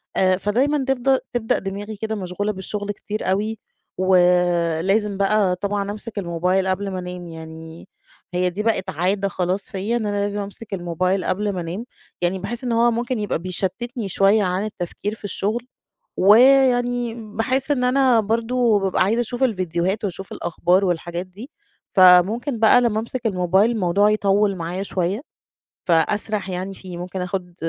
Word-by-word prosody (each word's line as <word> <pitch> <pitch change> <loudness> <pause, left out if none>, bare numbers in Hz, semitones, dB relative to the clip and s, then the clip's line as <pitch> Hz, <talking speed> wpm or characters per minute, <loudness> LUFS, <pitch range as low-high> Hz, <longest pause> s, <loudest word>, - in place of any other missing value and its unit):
آآ 185 -1 +3
فدايمًا 265 +8 +1
تفض 265 0 +2
تبدأ 230 -2 0
دماغي 200 +2 -6
كده 220 +1 -3
مشغولة 200 +2 -3
بالشُّغل 205 +1 -4
كتير 210 -1 -4
أوي، 215 +3 -1 0.4
ولازم 180 +2 +2
بقى 195 -2 +2
طبعًا 200 +1 -2
أمسِك 215 0 -6
الموبايل 180 +1 0
قبْل 195 +1 -1
ما 185 - -3
أنام، 180 -1 -7
يعني 160 0 -10 0.5
هي 180 0 +1
دي 200 +4 -4
بقِت 210 -4 0
عادة 190 +4 0
خلاص 185 +1 -2
فيَّ، 200 +5 -2
إن 225 -3 -1
أنا 205 0 -1
لازم 205 0 -1
أمسِك 205 +1 -8
الموبايل 180 +1 -1
قبْل 205 +2 -1
ما 180 - -3
أنام، 180 +8 -5 0.4
يعني 180 +2 0
باحس 235 +6 -5
إن 245 - -2
هو 235 +1 +3
ممكن 235 +1 -2
يبقى 205 -6 -1
بيشتِّتني 195 +5 -3
شويّة 200 +3 +3
عن 185 +2 -1
التفكير 205 +2 -5
في - - -15
الشغل 220 +4 -2 0.5
ويعني 245 +2 +4
باحس 235 +5 -2
إن 250 -3 +1
أنا 255 -2 +4
برضه 230 +1 +1
ببقى 195 -1 +1
عايزة 225 +5 +1
أشوف 245 +2 -3
الفيديوهات 185 -3 0
وأشوف 195 0 -5
الأخبار 175 +3 +1
والحاجات 175 0 -2
دي، 205 +9 -11 0.4
فممكن 195 - +5
بقى 225 +3 +6
لمّا 220 -3 +1
أمسِك 235 +1 -5
الموبايل 190 +2 +2
الموضوع 205 -1 +2
يطوِّل 205 -1 +2
معايا 175 +3 -4
شويّة 190 +3 -1 0.6
فأسرح 200 +4 +1
يعني 185 +2 -4
فيه، 180 -2 -9
ممكن 180 +1 -5
آخُد 180 -1 -4
200 Hz, 155 wpm, -22 LUFS, 180-225 Hz, 0.6 s, بقى